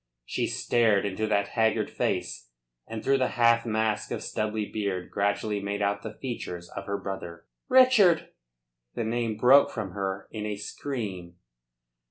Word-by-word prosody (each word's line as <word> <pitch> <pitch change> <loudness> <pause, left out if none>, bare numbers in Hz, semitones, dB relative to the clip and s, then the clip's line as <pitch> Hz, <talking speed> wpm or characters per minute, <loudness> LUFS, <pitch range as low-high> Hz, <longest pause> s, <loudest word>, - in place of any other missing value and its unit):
She - - -1
stared 110 -5 +2
into 100 +2 -2
that 100 -1 +1
haggard 110 -1 +1
face, - - -2 0.4
and 110 -1 -6
through 135 0 +3
the 130 - +2
half 115 0 +4
mask 110 -1 0
of - - -4
stubbly 110 0 -2
beard 100 -4 -3
gradually 100 +1 0
made 100 +1 -2
out 100 0 0
the 110 0 -7
features 90 -9 -6
of 100 - -7
her 100 0 -1
brother. 85 -4 -7 0.2
"Richard!" 255 -9 +5 0.7
The - - -1
name 115 -1 -1
broke 130 +5 +6
from 105 -5 -5
her 95 0 -4
in 110 -2 -5
a 105 - -2
scream. 100 -5 -5
105 Hz, 155 wpm, -27 LUFS, 100-115 Hz, 0.7 s, broke